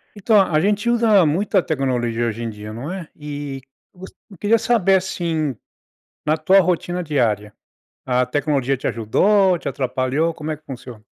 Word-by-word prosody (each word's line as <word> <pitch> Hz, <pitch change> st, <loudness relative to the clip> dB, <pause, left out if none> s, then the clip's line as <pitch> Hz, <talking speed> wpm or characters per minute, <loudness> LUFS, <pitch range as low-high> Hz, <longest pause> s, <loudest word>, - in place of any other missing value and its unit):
Então, 210 Hz, +1 st, +3 dB
a 165 Hz, -5 st, +1 dB
gente 205 Hz, +5 st, +1 dB
usa 225 Hz, -6 st, +4 dB
muita 180 Hz, +5 st, +1 dB
tecnologia 120 Hz, -6 st, -1 dB
hoje 115 Hz, +1 st, -4 dB
em 115 Hz, -, -3 dB
dia, 105 Hz, 0 st, -8 dB
não 130 Hz, +9 st, -6 dB
é. 185 Hz, -4 st, -6 dB
E 145 Hz, -2 st, -6 dB, 0.3 s
voc 190 Hz, +1 st, -11 dB, 0.2 s
eu 195 Hz, -, -14 dB
queria 210 Hz, +6 st, +3 dB
saber, 220 Hz, -4 st, +3 dB
assim, 165 Hz, -6 st, -1 dB, 0.7 s
na 155 Hz, +1 st, +2 dB
tua 185 Hz, +5 st, +5 dB
rotina 180 Hz, 0 st, 0 dB
diária, 110 Hz, -9 st, 0 dB, 0.5 s
a 125 Hz, 0 st, +1 dB
tecnologia 135 Hz, 0 st, 0 dB
te -, -, -3 dB
ajudou, 185 Hz, -, +2 dB
te -, -, -8 dB
atrapalhou? 135 Hz, +4 st, -1 dB
Como 155 Hz, 0 st, -5 dB
é 155 Hz, -, -4 dB
que 155 Hz, -, -32 dB
funciona? 120 Hz, -4 st, -9 dB
155 Hz, 165 wpm, -20 LUFS, 130-190 Hz, 0.7 s, tua